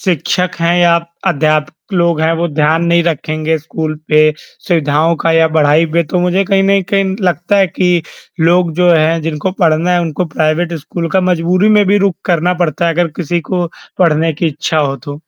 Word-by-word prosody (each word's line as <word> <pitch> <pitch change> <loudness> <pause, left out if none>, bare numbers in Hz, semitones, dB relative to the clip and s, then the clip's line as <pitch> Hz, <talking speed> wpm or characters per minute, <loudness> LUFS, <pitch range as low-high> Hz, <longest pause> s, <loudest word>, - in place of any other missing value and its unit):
शिक्षक 180 0 -1
हैं 170 +1 +2
या 170 -1 +4 0.3
अध्यापक 155 +2 -1
लोग 170 -3 +1
हैं, 160 +1 +2
वो 170 +1 -1
ध्यान 155 +2 +1
नहीं 170 0 +2
रखेंगे 155 0 -1
स्कूल 155 0 -5
पे, 155 0 +4 0.4
सुविधाओं 160 -1 +1
का 165 - +3
या 165 0 +3
पढ़ाई 155 +2 +3
पे 170 - +4
तो 180 - +1
मुझे 180 +2 +1
कहीं 195 0 +1
न 195 0 +2
कहीं 195 -1 0
लगता 175 +2 0
है 195 - +4
कि, 180 -1 0 0.4
लोग 170 +1 +2
जो 180 +1 +3
हैं 160 +1 +2
जिनको 160 +3 -3
पढ़ना 165 0 +2
है 175 - +2
उनको 170 +1 -2
प्राइवेट 160 +2 0
स्कूल 165 +3 -5
का 190 - +2
मजबूरी 180 +4 +1
में 205 - +4
भी 200 +2 +3
रुक 180 - -2
करना 175 0 +1
पड़ता 165 0 -1
है, 165 - +1
अगर 175 +1 +1
किसी 175 0 -2
को 180 -2 0 0.3
पढ़ने 165 -2 +2
की 155 +3 -2
इच्छा 155 +1 -2
हो 140 -2 0
तो। 145 +3 -9
170 Hz, 195 wpm, -13 LUFS, 155-180 Hz, 0.4 s, या